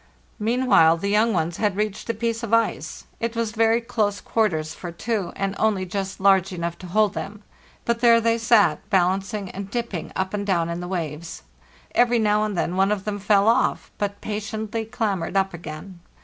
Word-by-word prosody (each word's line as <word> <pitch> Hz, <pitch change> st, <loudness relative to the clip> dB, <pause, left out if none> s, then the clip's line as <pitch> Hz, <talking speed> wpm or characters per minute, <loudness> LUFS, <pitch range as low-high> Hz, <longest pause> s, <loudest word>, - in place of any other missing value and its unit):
Meanwhile 215 Hz, -8 st, +4 dB
the 200 Hz, +4 st, -2 dB
young 220 Hz, +3 st, +3 dB
ones 170 Hz, -3 st, -1 dB
had 210 Hz, -3 st, 0 dB
reached 210 Hz, +1 st, -2 dB
a 230 Hz, -, 0 dB
piece 230 Hz, +1 st, -2 dB
of 230 Hz, -1 st, +2 dB
ice. 230 Hz, 0 st, -1 dB
It 230 Hz, 0 st, -2 dB
was 230 Hz, -2 st, -1 dB
very 225 Hz, +1 st, +3 dB
close 210 Hz, -3 st, -1 dB
quarters 160 Hz, -9 st, 0 dB
for 175 Hz, -, -7 dB
two, 210 Hz, +2 st, -2 dB
and 195 Hz, 0 st, -2 dB
only 205 Hz, -4 st, +1 dB
just 195 Hz, +1 st, -4 dB
large 195 Hz, 0 st, +4 dB
enough 170 Hz, -2 st, -3 dB
to 185 Hz, -, -9 dB
hold 210 Hz, +2 st, +2 dB
them; 205 Hz, +1 st, -6 dB, 0.4 s
but 235 Hz, 0 st, 0 dB
there 235 Hz, -1 st, +6 dB
they 230 Hz, 0 st, +1 dB
sat, 220 Hz, -8 st, +4 dB
balancing 195 Hz, +1 st, 0 dB
and 195 Hz, 0 st, -7 dB
dipping 230 Hz, -7 st, -4 dB
up 190 Hz, +1 st, -2 dB
and 205 Hz, -1 st, -1 dB
down 175 Hz, -4 st, 0 dB
in 170 Hz, 0 st, -3 dB
the 180 Hz, -, -5 dB
waves. 165 Hz, -3 st, -5 dB, 0.5 s
Every 240 Hz, 0 st, +4 dB
now 210 Hz, -1 st, +2 dB
and 210 Hz, -3 st, -3 dB
then 175 Hz, +1 st, -1 dB
one 195 Hz, +2 st, +3 dB
of 200 Hz, -2 st, -2 dB
them 205 Hz, -1 st, -3 dB
fell 200 Hz, +1 st, +3 dB
off, 230 Hz, -, +2 dB
but 205 Hz, -1 st, -3 dB
patiently 215 Hz, +1 st, -4 dB
clam 220 Hz, -4 st, -1 dB
bered 165 Hz, +3 st, -5 dB
up 195 Hz, -1 st, +1 dB
again. 170 Hz, +2 st, -8 dB
205 Hz, 195 wpm, -23 LUFS, 185-225 Hz, 0.5 s, there